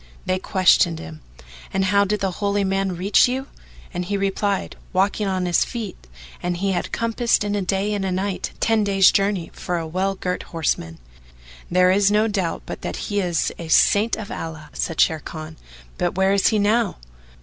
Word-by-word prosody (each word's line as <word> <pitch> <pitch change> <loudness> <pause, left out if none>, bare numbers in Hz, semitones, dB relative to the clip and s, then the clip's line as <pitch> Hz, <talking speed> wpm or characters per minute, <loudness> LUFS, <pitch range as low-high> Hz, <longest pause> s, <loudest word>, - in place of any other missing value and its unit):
They 185 - 0
questioned 185 -3 +3
him, 80 - -9 0.5
"And 190 0 +1
how 200 +2 +3
did 210 +1 -1
the 195 -1 0
Holy 200 0 +1
Man 195 -1 0
reach 195 +7 +4
you?"; 260 +2 -2 0.5
and 180 0 -2
he 200 +3 -2
replied, 195 0 -1 0.2
"Walking 195 +2 +1
on 185 -1 -1
his 175 -1 +3
feet 215 - -7 0.3
and 175 0 -2
he 195 +2 0
had 175 - -2
compassed 230 0 +1
in 205 0 -2
a 205 - 0
day 195 +3 0
and 200 -1 -2
a 190 - -1
night, 190 +1 -2
ten 225 -1 +2
days' 195 -2 +5
journey 195 -4 0
for 175 - -3
a 165 - -3
well 190 +4 -1
girt 180 -1 -3
horseman." 85 - -2 0.7
"There 180 +1 +4
is 200 +1 +4
no 210 +2 +3
doubt 190 -6 -2
but - - -7
that - - -4
he 205 -1 -2
is 175 -4 0
a 170 - -6
Saint 205 +7 +4
of 210 -2 -7
Allah," 155 -2 -7
said 165 -3 -3
Sharrkan, 155 0 -1 0.4
"but - - 0
where 190 +1 +3
is 200 - +3
he 220 - +2
now?" 210 +1 +1
195 Hz, 190 wpm, -22 LUFS, 180-205 Hz, 0.7 s, days